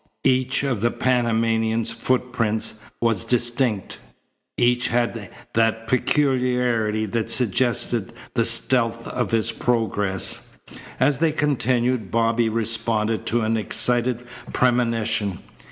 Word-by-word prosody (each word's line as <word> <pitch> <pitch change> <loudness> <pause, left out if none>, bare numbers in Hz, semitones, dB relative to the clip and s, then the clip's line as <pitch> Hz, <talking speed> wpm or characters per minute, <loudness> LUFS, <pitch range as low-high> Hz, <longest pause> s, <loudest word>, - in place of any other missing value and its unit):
Each 130 +1 +2
of 130 -7 -1
the 120 - +3
Panamanian's 115 -2 +1
footprints 125 -3 -1 0.3
was 115 -5 +1
distinct. 120 -3 -1 0.6
Each 120 +1 +2
had 115 -4 -1 0.2
that 115 0 +1
peculiarity 125 -5 +1
that 110 +1 -2
suggested 120 -2 0 0.2
the - - +2
stealth 115 -2 +2
of - - -2
his 115 0 +1
progress. 110 -5 -1 0.6
As 135 +1 +2
they 165 -1 +3
continued 125 - 0
Bobby 115 +2 +2
responded 110 0 -1
to 120 +1 +1
an 110 +1 +1
excited 120 +2 0 0.3
premonition. 115 -6 +1
115 Hz, 105 wpm, -23 LUFS, 110-125 Hz, 0.6 s, the